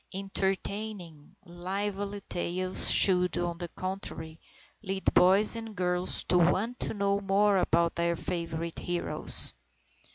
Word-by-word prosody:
Entertaining, 195 Hz, -3 st, -4 dB
lively 200 Hz, +3 st, -4 dB
tales 185 Hz, +1 st, -1 dB
should, 180 Hz, -2 st, +5 dB
on 175 Hz, -1 st, -3 dB
the 175 Hz, -, -5 dB
contrary, 165 Hz, -3 st, -6 dB, 0.4 s
lead 195 Hz, -2 st, -2 dB
boys 195 Hz, +5 st, +6 dB
and 225 Hz, -2 st, -7 dB
girls 180 Hz, -1 st, -1 dB
to 180 Hz, -, +1 dB
want 195 Hz, +8 st, +1 dB
to -, -, -3 dB
know 200 Hz, 0 st, 0 dB
more 200 Hz, +1 st, +2 dB
about 170 Hz, -2 st, +1 dB
their 170 Hz, 0 st, -1 dB
favourite 170 Hz, -1 st, -5 dB
heroes. 175 Hz, -1 st, -1 dB
185 Hz, 120 wpm, -28 LUFS, 175-200 Hz, 0.4 s, boys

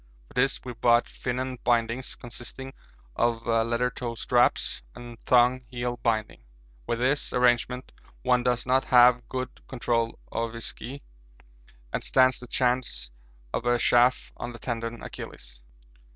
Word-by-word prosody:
For -, -, -17 dB
this 135 Hz, +2 st, +2 dB
we 125 Hz, -, -5 dB
brought 120 Hz, +1 st, +3 dB
'Finon' 130 Hz, 0 st, -4 dB
bindings, 120 Hz, +1 st, 0 dB
consisting 120 Hz, +2 st, -8 dB, 0.4 s
of 120 Hz, -1 st, 0 dB
leather 115 Hz, +2 st, +1 dB
toe 120 Hz, -1 st, -5 dB
straps 120 Hz, +1 st, +2 dB
and 120 Hz, -1 st, -10 dB
thong 125 Hz, 0 st, +4 dB
heel 120 Hz, 0 st, -3 dB
binding. 110 Hz, -2 st, -1 dB, 0.5 s
With 115 Hz, -, 0 dB
this 130 Hz, +4 st, +1 dB
arrangement 125 Hz, 0 st, +2 dB, 0.3 s
one 125 Hz, -1 st, +3 dB
does 125 Hz, -1 st, 0 dB
not 130 Hz, +1 st, +2 dB
have 125 Hz, -1 st, +5 dB
good 130 Hz, 0 st, -5 dB
control 115 Hz, -2 st, -1 dB
of 115 Hz, 0 st, -2 dB
his 115 Hz, -1 st, -5 dB
ski 135 Hz, +4 st, -7 dB, 0.9 s
and -, -, -2 dB
stands 130 Hz, -1 st, +4 dB
the 125 Hz, -, -10 dB
chance 120 Hz, -, 0 dB, 0.4 s
of 120 Hz, -, -2 dB
a 120 Hz, 0 st, +4 dB
chafe 120 Hz, +2 st, +3 dB
on 120 Hz, 0 st, -5 dB
the -, -, -9 dB
'tendon 115 Hz, -1 st, -4 dB
Achillis.' -, -, -9 dB
120 Hz, 140 wpm, -27 LUFS, 115-125 Hz, 0.9 s, have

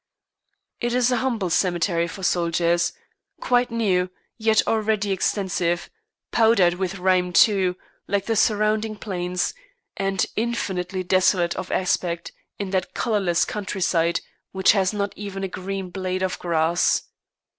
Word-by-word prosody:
It 240 Hz, 0 st, -1 dB
is 250 Hz, 0 st, +3 dB
a 250 Hz, -, +2 dB
humble 225 Hz, -8 st, -1 dB
cemetery 175 Hz, -1 st, +1 dB
for 190 Hz, +3 st, -9 dB
soldiers, 170 Hz, -1 st, +1 dB, 0.5 s
quite 245 Hz, 0 st, +2 dB
new, 195 Hz, -6 st, +1 dB, 0.3 s
yet 220 Hz, -1 st, +2 dB
already 215 Hz, -2 st, +1 dB
extensive, 180 Hz, -3 st, -1 dB, 0.4 s
powdered 220 Hz, -6 st, +4 dB
with 190 Hz, +1 st, -3 dB
rime 180 Hz, -1 st, +2 dB
too, 185 Hz, -1 st, +4 dB, 0.3 s
like 200 Hz, -1 st, 0 dB
the 225 Hz, -, 0 dB
surrounding 215 Hz, 0 st, +1 dB
plains, 180 Hz, -3 st, -2 dB, 0.4 s
and 195 Hz, -2 st, 0 dB
infinitely 190 Hz, -5 st, -2 dB
desolate 180 Hz, -1 st, +2 dB
of 185 Hz, -, -5 dB
aspect 175 Hz, -2 st, -1 dB, 0.3 s
in 200 Hz, -2 st, -4 dB
that 185 Hz, -2 st, -2 dB
colourless 200 Hz, -8 st, +1 dB
countryside, 185 Hz, -5 st, 0 dB, 0.3 s
which 190 Hz, 0 st, +5 dB
has 190 Hz, -3 st, +2 dB
not 205 Hz, -1 st, -2 dB
even 195 Hz, -1 st, -6 dB
a -, -, 0 dB
green 190 Hz, 0 st, -5 dB
blade 185 Hz, 0 st, -2 dB
of 185 Hz, -, -2 dB
grass. 170 Hz, 0 st, +1 dB
190 Hz, 130 wpm, -23 LUFS, 180-210 Hz, 0.5 s, which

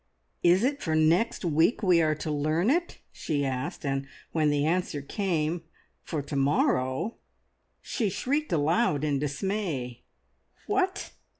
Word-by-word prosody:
"Is 175 Hz, +4 st, +4 dB
it 280 Hz, +3 st, 0 dB
for 160 Hz, -2 st, 0 dB
next 165 Hz, +7 st, +2 dB
week 165 Hz, +8 st, +2 dB
we 180 Hz, -3 st, +5 dB
are 155 Hz, -1 st, +2 dB
to 155 Hz, +1 st, -4 dB
learn 155 Hz, -, +1 dB
it?" 345 Hz, +3 st, 0 dB
she 145 Hz, -3 st, -2 dB
asked, 130 Hz, +2 st, -3 dB
and 135 Hz, 0 st, -1 dB, 0.2 s
when 155 Hz, -2 st, +2 dB
the 145 Hz, 0 st, +1 dB
answer 170 Hz, -2 st, 0 dB
came, 165 Hz, +1 st, -1 dB, 0.4 s
"For 150 Hz, -3 st, -4 dB
to 140 Hz, -, -6 dB
morrow," 135 Hz, -, +1 dB, 0.7 s
she 220 Hz, -5 st, -1 dB
shrieked 285 Hz, +10 st, -1 dB
aloud 155 Hz, +1 st, +2 dB
in 145 Hz, -2 st, +1 dB
dismay. 145 Hz, -, -3 dB, 0.6 s
"What! 390 Hz, -1 st, -1 dB
160 Hz, 135 wpm, -28 LUFS, 145-200 Hz, 0.7 s, we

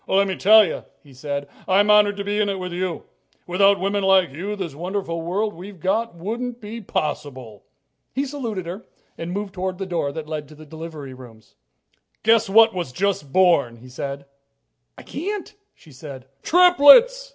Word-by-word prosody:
"Let 195 Hz, +1 st, +3 dB
me 190 Hz, -, -2 dB
tell 215 Hz, +3 st, +6 dB
you," 165 Hz, -, -5 dB, 0.2 s
he 140 Hz, -3 st, -17 dB
said, 140 Hz, +2 st, -5 dB, 0.2 s
"I'm 200 Hz, +2 st, +4 dB
honored 205 Hz, -1 st, +4 dB
to 200 Hz, -, -3 dB
be 205 Hz, +1 st, -2 dB
in 210 Hz, -1 st, +1 dB
it 195 Hz, -, -2 dB
with 180 Hz, -1 st, -6 dB
you. 180 Hz, -1 st, -3 dB, 0.4 s
Without 195 Hz, +3 st, +3 dB
women 200 Hz, +2 st, -1 dB
like 190 Hz, -4 st, +3 dB
you, 190 Hz, +9 st, -5 dB
this 185 Hz, -7 st, -5 dB
wonderful 175 Hz, +1 st, -4 dB
world 200 Hz, +6 st, -2 dB
we've 185 Hz, +2 st, -11 dB
got 205 Hz, +4 st, -1 dB
wouldn't 235 Hz, +7 st, -5 dB
be 225 Hz, +1 st, -8 dB
possible." 130 Hz, -, -5 dB, 0.5 s
He 275 Hz, +2 st, -2 dB
saluted 235 Hz, -10 st, -5 dB
her 185 Hz, +6 st, -7 dB, 0.3 s
and 165 Hz, +1 st, -6 dB
moved 200 Hz, +1 st, -4 dB
toward 185 Hz, -1 st, -4 dB
the 195 Hz, -, -4 dB
door 170 Hz, -6 st, -2 dB
that 155 Hz, +1 st, -7 dB
led 155 Hz, -2 st, -5 dB
to 155 Hz, -, -15 dB
the 155 Hz, +1 st, -13 dB
delivery 155 Hz, -3 st, -9 dB
rooms. 115 Hz, -4 st, -15 dB, 0.7 s
"Guess 225 Hz, -1 st, +3 dB
what 225 Hz, +2 st, +6 dB
was 175 Hz, -8 st, -4 dB
just 180 Hz, -2 st, -2 dB
born," 170 Hz, -9 st, +3 dB
he 125 Hz, +2 st, -15 dB
said. 140 Hz, +2 st, -6 dB, 0.7 s
"I -, -, -11 dB
can't," 385 Hz, +7 st, -5 dB, 0.2 s
she 155 Hz, -, -19 dB
said. 135 Hz, -1 st, -10 dB, 0.2 s
"Triplets!" 360 Hz, -, +6 dB
185 Hz, 180 wpm, -22 LUFS, 155-210 Hz, 0.7 s, tell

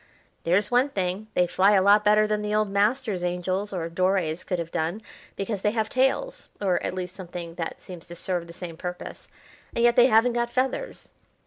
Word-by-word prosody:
"There's 200 Hz, +6 st, +2 dB
one 250 Hz, +3 st, +3 dB
thing, 190 Hz, -1 st, -2 dB
they 180 Hz, -, +4 dB
fly 190 Hz, +3 st, +3 dB
a 195 Hz, -, +5 dB
lot 205 Hz, +2 st, +5 dB
better 210 Hz, 0 st, +5 dB
than 210 Hz, 0 st, -1 dB
the 210 Hz, 0 st, -1 dB
old 215 Hz, -2 st, +1 dB
masters' 210 Hz, -1 st, +1 dB
angels 185 Hz, +3 st, -2 dB
or 175 Hz, -4 st, -3 dB
Doré's 180 Hz, -1 st, 0 dB
could 180 Hz, -, -2 dB
have 165 Hz, -1 st, -5 dB
done, 170 Hz, +7 st, -2 dB, 0.3 s
because 195 Hz, 0 st, -3 dB
they 210 Hz, -, +2 dB
have 220 Hz, -2 st, -1 dB
tails 270 Hz, -, 0 dB
or 190 Hz, -3 st, +1 dB
at -, -, -3 dB
least 180 Hz, 0 st, -5 dB
something 175 Hz, -2 st, -7 dB
that 165 Hz, -1 st, -5 dB
seems 180 Hz, -3 st, -11 dB
to 175 Hz, -, -9 dB
serve 175 Hz, -1 st, -3 dB
the -, -, -10 dB
same 170 Hz, -1 st, -8 dB
purpose, 180 Hz, +1 st, -7 dB, 0.5 s
and 235 Hz, -, +1 dB
yet 240 Hz, 0 st, +5 dB
they 245 Hz, 0 st, +7 dB
haven't 235 Hz, +1 st, +4 dB
got 235 Hz, 0 st, 0 dB
feathers." 265 Hz, -, -2 dB
195 Hz, 205 wpm, -25 LUFS, 180-220 Hz, 0.5 s, they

